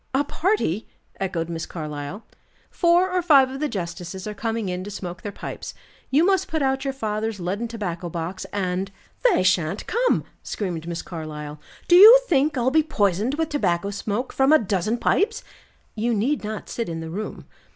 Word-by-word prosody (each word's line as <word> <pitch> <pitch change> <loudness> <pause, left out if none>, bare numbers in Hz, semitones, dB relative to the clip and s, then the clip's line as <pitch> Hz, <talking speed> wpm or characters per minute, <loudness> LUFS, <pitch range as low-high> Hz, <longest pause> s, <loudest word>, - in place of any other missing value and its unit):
"A 275 - +3
party!" 290 - 0 0.3
echoed 175 -4 -2
Miss 165 -1 -4
Carlyle. 150 +4 -6 0.5
"Four 350 +1 +3
or 365 0 +1
five 280 -6 +5
of 270 - -6
the 300 0 -1
justices 180 -1 -5
are 210 - -4
coming 225 0 -2
in 180 0 -3
to 200 - -7
smoke 180 -3 -6
their 205 - -5
pipes. - - -7 0.3
You 300 +6 +4
must 385 0 +2
put 315 -2 -1
out 265 0 +1
your 270 -1 -2
father's 215 -3 -2
leaden 195 +6 -2
tobacco 180 -7 -4
box, 170 +3 -5
and 190 -1 -2 0.2
" - - -36
"They 270 - +2
shan't 185 0 +1
come!" - - +1 0.2
screamed 170 -5 -4
Miss 170 0 -4
Carlyle. 150 -3 -7 0.3
"Do 350 - +6
you 440 +7 +11
think 290 - +2
I'll 250 +1 +2
be 315 +2 +5
poisoned 215 - 0
with 320 0 -1
tobacco 200 - 0
smoke 210 +5 -3
from 270 +2 +3
a 310 - +8
dozen 210 - -1
pipes?" 435 - +1 0.5
"You 230 +1 0
need 250 +8 0
not 215 0 -5
sit 230 -6 -3
in 165 -1 -4
the 160 0 -6
room." 210 +5 -5
210 Hz, 185 wpm, -23 LUFS, 180-275 Hz, 0.5 s, you